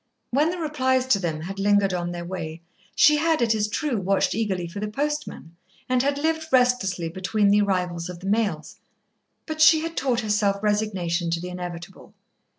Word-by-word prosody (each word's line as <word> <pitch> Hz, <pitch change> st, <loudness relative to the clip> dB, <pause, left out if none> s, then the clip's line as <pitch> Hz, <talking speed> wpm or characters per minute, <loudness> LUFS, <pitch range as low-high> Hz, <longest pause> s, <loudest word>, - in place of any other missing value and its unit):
When 290 Hz, +6 st, +2 dB
the 360 Hz, -, -3 dB
replies 260 Hz, -5 st, 0 dB
to 205 Hz, -, +4 dB
them 160 Hz, -4 st, -3 dB
had 195 Hz, +4 st, -6 dB
lingered 200 Hz, -1 st, +3 dB
on 175 Hz, -1 st, -2 dB
their 175 Hz, 0 st, -6 dB
way 165 Hz, -2 st, -6 dB, 0.3 s
she 300 Hz, -1 st, +6 dB
had, 320 Hz, +1 st, +1 dB
it 230 Hz, -2 st, +2 dB
is 210 Hz, -1 st, 0 dB
true, 260 Hz, +3 st, -2 dB
watched 195 Hz, +1 st, +1 dB
eagerly 190 Hz, -6 st, -2 dB
for 180 Hz, +4 st, -7 dB
the 210 Hz, -, -3 dB
postman, 290 Hz, -, -4 dB, 0.3 s
and 255 Hz, -1 st, +2 dB
had 280 Hz, +1 st, 0 dB
lived 320 Hz, +2 st, -1 dB
restlessly 245 Hz, -9 st, +2 dB
between 190 Hz, +4 st, 0 dB
the 205 Hz, +1 st, +4 dB
arrivals 180 Hz, -3 st, -1 dB
of 180 Hz, -1 st, -8 dB
the 185 Hz, -, -11 dB
mails, 210 Hz, +1 st, -1 dB, 0.7 s
but 315 Hz, -1 st, -4 dB
she 315 Hz, 0 st, +7 dB
had 330 Hz, +1 st, -5 dB
taught 255 Hz, -3 st, 0 dB
herself 210 Hz, -2 st, 0 dB
resignation 190 Hz, -5 st, 0 dB
to 165 Hz, 0 st, -1 dB
the 180 Hz, +1 st, -6 dB
inevitable. 180 Hz, 0 st, -8 dB
205 Hz, 185 wpm, -24 LUFS, 180-260 Hz, 0.7 s, she